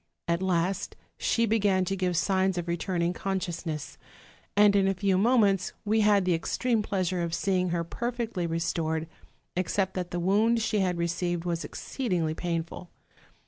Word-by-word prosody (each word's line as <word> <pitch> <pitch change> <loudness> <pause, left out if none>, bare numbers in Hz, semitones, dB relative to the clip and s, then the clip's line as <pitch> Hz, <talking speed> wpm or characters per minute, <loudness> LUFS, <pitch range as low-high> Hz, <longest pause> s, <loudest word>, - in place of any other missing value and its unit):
At 170 +1 +1
last 185 +1 0 0.2
she 230 - +1
began 200 -4 +2
to 195 - -1
give 180 -2 0
signs 190 +1 +1
of 175 0 -3
return 170 +1 -1
ing 175 +1 +1
consciousness; 175 -6 -4 0.6
and 205 -1 +6
in 195 -1 +4
a 195 - +1
few 195 0 +1
moments 200 -3 +3
we 215 +2 +2
had 205 -2 +4
the 180 - +3
ex 165 - -2
treme 240 -3 +2
pleasure 185 -3 -1
of 170 0 -1
seeing 185 0 +1
her 170 0 0
perfectly 230 -1 -3
restored, 160 -1 -1 0.5
except 190 +1 0
that 180 -2 -3
the 175 - -3
wound 210 +6 +3
she 215 -1 0
had 180 -2 +1
received 170 0 -1
was 170 -1 -1
exceedingly 180 - -2
pain 170 0 -2
ful. 170 +1 -11
185 Hz, 170 wpm, -28 LUFS, 170-200 Hz, 0.6 s, and